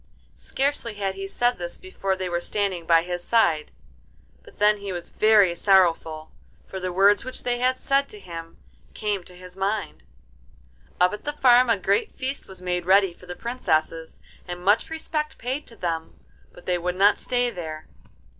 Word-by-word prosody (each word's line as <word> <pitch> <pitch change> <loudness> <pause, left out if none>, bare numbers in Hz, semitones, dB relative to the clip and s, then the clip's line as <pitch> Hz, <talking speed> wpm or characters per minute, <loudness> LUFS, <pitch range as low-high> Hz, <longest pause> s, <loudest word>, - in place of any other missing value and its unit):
Scarcely 270 -5 -1
had 195 -1 -2
he 195 0 -6
said 245 +2 0
this 175 0 -5
before 195 - -3
they 185 -1 -4
were 175 -1 -2
standing 190 -4 -2
by 165 -1 +5
his 175 0 -4
side, 170 -10 +2 0.7
but - - -18
then 210 0 +4
he 200 -1 -6
was 175 -1 -6
very 210 -5 +5
sorrowful, 170 -4 +2 0.3
for 190 - -7
the 185 0 -3
words 200 +3 +4
which 255 +1 -7
they 245 -1 -1
had 255 +1 +2
said 275 +1 +1
to 210 - -11
him 165 -3 -9 0.4
came 205 -4 -2
to 180 - -13
his 180 0 -12
mind. 200 +2 -2 1.0
Up 180 +2 +4
at 210 - -7
the 295 - -3
farm 250 -3 +5
a 230 - +4
great 200 +1 +1
feast 265 +2 -5
was 190 -1 -12
made 180 -1 -2
ready 195 -1 +5
for 180 - -17
the 180 - -6
Princesses, 165 -9 -2 0.3
and 175 0 -7
much 205 +3 +3
respect 315 -1 -3
paid 260 +5 -4
to 230 - -15
them, 165 - -4 0.3
but - - -16
they 180 -1 0
would 180 +1 -2
not 200 +2 +4
stay 245 -1 0
there. 160 -4 -7
195 Hz, 185 wpm, -24 LUFS, 175-235 Hz, 1.0 s, by